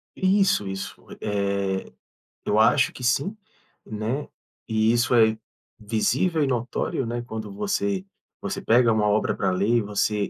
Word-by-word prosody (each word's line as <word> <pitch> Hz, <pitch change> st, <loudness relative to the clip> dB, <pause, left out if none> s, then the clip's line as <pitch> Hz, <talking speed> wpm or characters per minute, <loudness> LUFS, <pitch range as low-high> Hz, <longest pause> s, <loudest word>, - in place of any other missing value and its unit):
Isso, 190 Hz, -, +2 dB
isso. 95 Hz, 0 st, -6 dB, 0.2 s
Eh, 100 Hz, -2 st, -1 dB, 0.5 s
eu 105 Hz, -, +2 dB
acho 110 Hz, -, +4 dB
que 125 Hz, -, -10 dB
sim, 140 Hz, -, +1 dB, 0.5 s
né, 110 Hz, +7 st, -3 dB, 0.4 s
e 110 Hz, 0 st, +2 dB
isso 120 Hz, +1 st, +2 dB
é 110 Hz, -1 st, +4 dB, 0.4 s
visível 125 Hz, -, +1 dB
e -, -, +1 dB
notório, 125 Hz, +1 st, -2 dB
né, 120 Hz, +1 st, -3 dB
quando 110 Hz, -3 st, -6 dB
você 200 Hz, -, -1 dB, 0.4 s
você 195 Hz, -1 st, -4 dB
pega 120 Hz, -, +4 dB
uma 105 Hz, -1 st, +2 dB
obra 105 Hz, +1 st, +1 dB
pra 95 Hz, -, 0 dB
ler 95 Hz, +3 st, 0 dB
e 115 Hz, -, +2 dB
você 105 Hz, 0 st, -1 dB
110 Hz, 145 wpm, -24 LUFS, 105-135 Hz, 0.5 s, acho